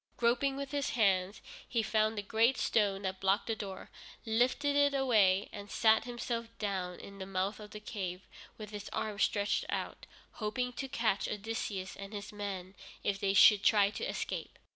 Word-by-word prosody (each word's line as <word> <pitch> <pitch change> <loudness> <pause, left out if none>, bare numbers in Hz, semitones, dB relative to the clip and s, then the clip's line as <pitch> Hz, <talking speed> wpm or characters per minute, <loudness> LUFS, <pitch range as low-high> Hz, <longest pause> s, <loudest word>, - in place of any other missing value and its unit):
Groping 250 +3 +2
with 280 0 -5
his 285 -2 -1
hands, 195 -3 +2 0.3
he 230 -3 +1
found 215 0 +1
the 205 - -2
great 225 +5 +3
stone 200 -3 +1
that 190 0 -3
blocked 195 +3 +2
the 225 - -1
door, 195 -3 -7 0.3
lifted 255 +6 +2
it 285 0 +4
away, 210 -8 +4
and 205 0 -8
sat 220 +1 +4
himself 240 -1 -3
down 190 -4 -3
in 200 0 -11
the 190 - -6
mouth 195 +2 -1
of 210 -1 -9
the 210 - -8
cave, 190 -4 -5 0.4
with 215 -1 -8
his 210 -1 -6
arms 210 -1 -2
stretched 205 -1 +1
out, - - -4 0.2
hoping 250 +3 -2
to 270 - -4
catch 230 -6 0
Odysseus 210 -2 -4
and 200 +1 -9
his 210 +1 -6
men 195 -3 -5 0.3
if 200 -1 0
they 195 0 +1
should 200 +1 +8
try 205 -2 +4
to - - -6
escape. - - -4
210 Hz, 180 wpm, -32 LUFS, 195-235 Hz, 0.4 s, should